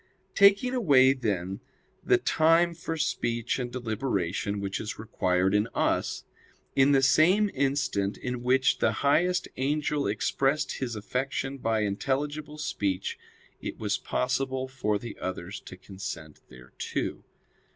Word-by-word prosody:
Taking 200 +5 +5
away, 140 - +5
then, 100 -7 -2 0.4
the - - +4
time 165 +2 +3
for 165 -1 -5
speech 120 -5 -1
and 125 -1 -3
deliberation 110 -5 -2
which 100 -1 -3
is 105 - -5
required 95 -4 0
in 105 +2 +2
us; - - 0 0.5
in 135 +1 +5
the 135 -1 +4
same 185 +9 +4
instant 135 -8 0
in 125 -1 -4
which 130 +2 +2
the - - +3
highest 180 +5 +3
angel 145 +2 0
expressed 135 +8 0
his 120 -4 -3
affection 135 +5 -3
by 115 -2 0
intelligible 145 +9 -2
speech, 100 -10 -2 0.4
it - - -5
was - - -1
possible 130 +1 -1
for 105 -6 -1
the 115 +1 -8
others 95 +1 -5
to 95 - -11
consent 95 -5 -8
thereto. 65 0 -5
130 Hz, 130 wpm, -28 LUFS, 105-145 Hz, 0.5 s, Taking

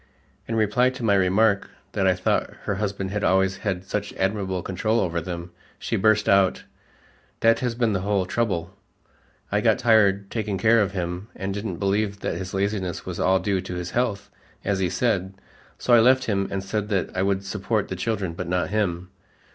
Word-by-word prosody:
In 115 - -2
reply 110 +4 +3
to 130 -1 -8
my 105 -3 +3
remark 100 +2 +3 0.2
that - - +1
I - - +4
thought - - 0
her 100 - -2
husband 100 -2 -3
had 105 0 -2
always 95 0 +2
had 95 -2 -3
such 100 +1 -3
admirable 95 -2 -1
control 110 +5 0
over 85 -4 -1
them, 85 +1 -6 0.3
she - - -3
burst 110 +1 +3
out, 100 -1 +3 0.8
"That 115 0 +4
has 120 -2 -1
been 115 -3 +1
the 95 - 0
whole 100 -1 0
trouble. 95 -4 -2 0.8
I - - +2
got - - +3
tired 100 -4 +3
taking 105 -4 -2
care 115 +4 +4
of 100 -1 -1
him 90 +1 -4
and 95 0 -3
didn't 100 -3 -4
believe 100 +1 0
that - - -1
his 95 -1 -5
laziness 95 -3 -2
was - - -5
all 95 +1 +3
due 95 0 0
to 90 -1 -6
his 90 0 -4
health, 110 -5 -1 0.3
as 100 -1 0
he 95 -2 +1
said, 95 -1 0 0.4
so 125 - +1
I 120 - +8
left 130 +3 +5
him 100 -4 0
and 95 -1 -3
said 105 +1 -3
that 95 -4 -1
I 95 - 0
would 100 0 0
support 105 +2 -1
the 95 - -4
children, 95 -3 -2
but 90 +2 -5
not 90 -2 0
him. 90 -4 -1
100 Hz, 195 wpm, -24 LUFS, 95-110 Hz, 0.8 s, I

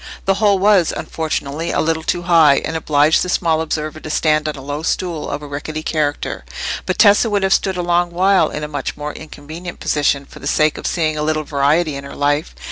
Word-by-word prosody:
The 195 - +3
hole 205 -2 +4
was, 195 -3 +4
unfortunately, 155 0 -3
a - - 0
little 160 0 0
too 175 +2 -2
high, 165 -5 +5
and 160 - -4
obliged 150 -1 +3
the 180 - -2
small 165 -3 +1
observer 155 -1 -3
to 155 - -8
stand 155 0 +1
on 150 - -4
a 135 - -9
low 145 +2 -4
stool 165 -1 -2
of 145 +1 -4
a - - -7
rickety 155 +2 -5
character; 150 -3 -2 0.4
but 185 - -1
Tessa 210 +2 +5
would 205 -2 0
have 190 - +3
stood 190 -2 0
a 180 - -1
long 175 0 +1
while 185 -1 +3
in 150 - -5
a - - -3
much 145 -2 -4
more 150 0 -5
inconvenient 160 +3 -9
position 145 -1 0
for - - -14
the 140 - -6
sake 155 +1 +2
of - - -4
seeing 155 -3 0
a - - -1
little 155 0 0
variety 150 +2 +1
in 140 - -6
her 140 - -9
life. 145 +3 0
155 Hz, 225 wpm, -18 LUFS, 150-175 Hz, 0.4 s, high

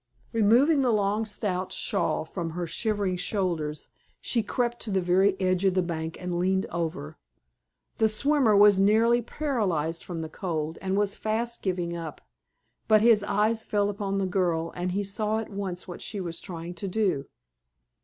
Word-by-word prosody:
Removing 245 +8 +4
the 250 -2 +2
long, 210 +1 +1
stout 195 -3 -2
shawl 190 -6 0
from 170 0 -4
her 175 +2 -3
shivering 200 0 -1
shoulders, 170 -6 -2 0.3
she 235 - 0
crept 240 +2 -2
to 225 - -3
the 195 -2 +1
very 190 +2 +2
edge 185 0 +1
of 190 -1 +3
the 185 - +3
bank 160 -1 -4
and 180 -1 -3
leaned 190 +1 +1
over. 160 - -4 0.8
The 220 - +3
swimmer 260 -1 +3
was 205 -1 +7
nearly 225 +4 +4
paralyzed 200 - -1
from 170 -2 -5
the 160 - -4
cold, 160 -2 -4
and 190 0 -1
was 205 -1 +1
fast 230 +2 -2
giving 175 -3 -2
up; 165 -2 -6 0.7
but 215 -1 +5
his 225 -3 +5
eyes 215 +2 +1
fell 205 -2 0
upon 200 -1 -3
the 195 - 0
girl, 175 -3 0
and 180 +1 -2
he 200 +2 0
saw 210 +2 0
at 220 -1 -5
once 195 -3 -4
what 175 - -8
she 210 - -4
was 170 -3 -4
trying 170 -2 -6
to 175 +3 -5
do. 185 -8 0
195 Hz, 175 wpm, -27 LUFS, 175-215 Hz, 0.8 s, was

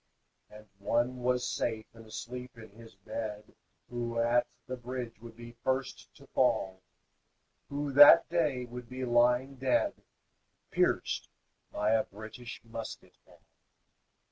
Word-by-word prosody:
And 105 0 -13
one 120 +5 +1
was 125 0 +1
safe 110 -2 -2
and 115 -1 -14
asleep 125 +2 -7
in 110 -2 -12
his 115 0 -15
bed 105 +2 -6 0.4
Who 120 -1 -3
at 120 +1 +3 0.2
the 130 - -4
bridge 125 -2 -6
would 115 -1 -11
be 120 0 -10
first 130 0 -2
to - - -16
fall, 95 -1 +1 0.9
Who 145 0 -2
that 145 +1 +10
day 150 -7 0
would 125 0 -9
be 130 0 -4
lying 125 +3 +3
dead, 130 0 +2 0.8
Pierced - - +1 0.4
by 105 +1 +1
a 110 -1 +4
British 110 +4 -9
musket 115 -1 -8
ball. - - -20
120 Hz, 130 wpm, -31 LUFS, 110-125 Hz, 0.9 s, that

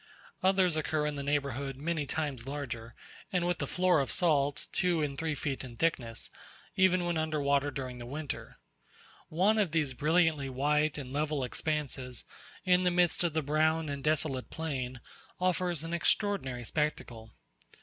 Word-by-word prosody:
Others 185 -3 +4
occur 155 -1 0
in 150 - -1
the 140 - -3
neighbourhood 140 -1 -1
many 155 0 -2
times 140 -6 -3
larger, 120 -5 -5 0.4
and 180 -2 +1
with 175 -2 0
a 140 - -1
floor 180 0 +3
of 135 - 0
salt, 145 -5 +2
two 175 -4 +1
and 140 -2 -2
three 160 +1 -2
feet 140 -1 -3
in 120 -3 -9
thickness, 120 -9 +1 0.4
even 185 -2 +4
when 170 -2 0
under 155 -1 -1
water 140 0 +2
during 130 -2 -5
the 120 - -7
winter. 145 +2 -6 0.7
One 195 +7 +3
of 190 -7 +1
these 150 -5 +1
brilliantly 155 0 +2
white 150 +3 +1
and 130 -2 -6
level 150 -1 0
expanses 130 -2 -2 0.4
in 180 -1 +5
the 180 - +4
midst 175 -1 +2
of 170 -3 +1
the 160 - +1
brown 155 +2 +2
and 140 -1 -4
desolate 150 -4 0
plain, 130 -6 -4 0.4
offers 180 -3 +1
an 165 +1 -4
extraordinary 170 - 0
spectacle. 120 -5 -3
150 Hz, 160 wpm, -31 LUFS, 135-165 Hz, 0.7 s, in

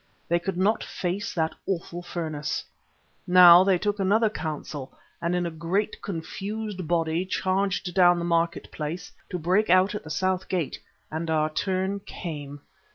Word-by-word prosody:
They 170 +1 +2
could 175 +1 -3
not 200 +4 +2
face 185 +3 -3
that 160 -2 0
awful 175 -2 -3
furnace. 155 -4 -3 0.6
Now 180 0 +9
they 190 -1 +3
took 205 +3 -1
another 210 +3 +3
counsel 150 -6 -6 0.2
and 170 +1 0
in 175 0 0
a 170 - -2
great 175 +7 -2
confused 195 +2 -5
body 165 0 +1
charged 190 -1 -1
down 175 -1 +5
the 170 - -2
market 170 0 0
place 155 +3 -5 0.2
to 180 - -3
break 185 +5 +1
out 185 +2 +5
at 210 - -5
the 155 - -10
south 185 +3 -1
gate, 175 -6 -2 0.3
and 160 +1 -3
our 155 -1 +1
turn 190 +3 -1
came. 145 -7 -7
175 Hz, 160 wpm, -26 LUFS, 165-190 Hz, 0.6 s, Now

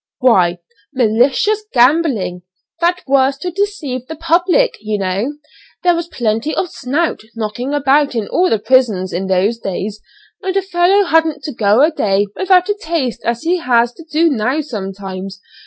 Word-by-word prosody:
"Why, 185 -9 +3 0.4
'malicious 260 - +2
gambling.' 245 - +2 0.4
That 350 +1 +1
was 275 0 +2
to 360 +5 -4
deceive 315 - -3
the 320 - -6
public, 350 +9 +2
you 215 0 -2
know. 195 +8 -2 0.5
There 355 -1 +4
was 335 0 -3
plenty 235 0 -2
of 360 - -2
'snout' 295 +7 -2
knocking 230 +4 -4
about 285 -1 +2
in 220 -3 -2
all 365 +1 +1
the 225 - +2
prisons 215 -6 +1
in 185 +3 -2
those 195 +5 +1
days, 200 +1 -4 0.4
and 385 -1 -2
a - - +2
fellow 380 +2 +3
hadn't 325 -4 +1
to 300 - -4
go 215 +3 +3
a 315 - +4
day 200 -8 +1
without 370 -1 +3
a 415 - +1
taste 315 -7 -2
as 235 +3 -1
he 350 +2 +1
has 240 -6 +2
to 330 - -13
do 320 +1 +1
now 255 +4 0
sometimes. 195 -6 -6
265 Hz, 165 wpm, -16 LUFS, 215-335 Hz, 0.5 s, There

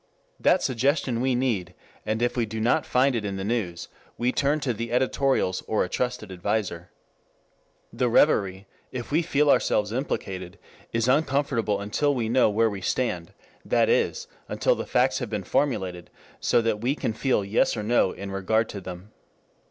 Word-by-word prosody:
That - - +3
suggestion 130 -1 +1
we 130 -1 +1
need, 105 -9 -1 0.3
and 110 +2 0
if 120 - 0
we 120 -3 0
do 110 +1 -5
not 115 +3 +1
find 130 +1 +3
it 115 - -1
in 100 -1 -3
the 95 - -4
news 95 -6 -2 0.3
we 120 +1 +1
turn 145 +3 +1
to 130 -3 0
the 115 +1 -5
editorials 130 -5 +1
or 110 - +1
to - - +2
a - - -8
trusted 125 -4 -2
adviser. 90 -2 -2 1.0
The 125 - +1
revery, 100 -7 +3 0.3
if 125 0 -6
we 160 +3 +3
feel 150 -3 +1
ourselves 105 0 +2
implicated, 95 -8 -4 0.3
is 115 +1 0
uncomfortable 130 -6 +1
until 140 +8 0
we 115 -3 -1
know 125 -1 +4
where 110 +2 +2
we 100 -1 -6
stand, 90 -5 -1 0.3
that - - +2
is, 475 0 +1 0.2
until - - +1
the - - -5
facts - - +2
have - - -4
been - - -3
formulated 95 -11 -1 0.3
so 120 - +2
that 110 -2 0
we 130 +4 +1
can 110 - -2
feel 110 -3 0
Yes 105 +3 +1
or 105 - -3
No 110 -3 +2
in 100 0 -7
regard 110 +4 0
to 100 - -6
them. 90 +3 -9
115 Hz, 180 wpm, -25 LUFS, 100-130 Hz, 1.0 s, know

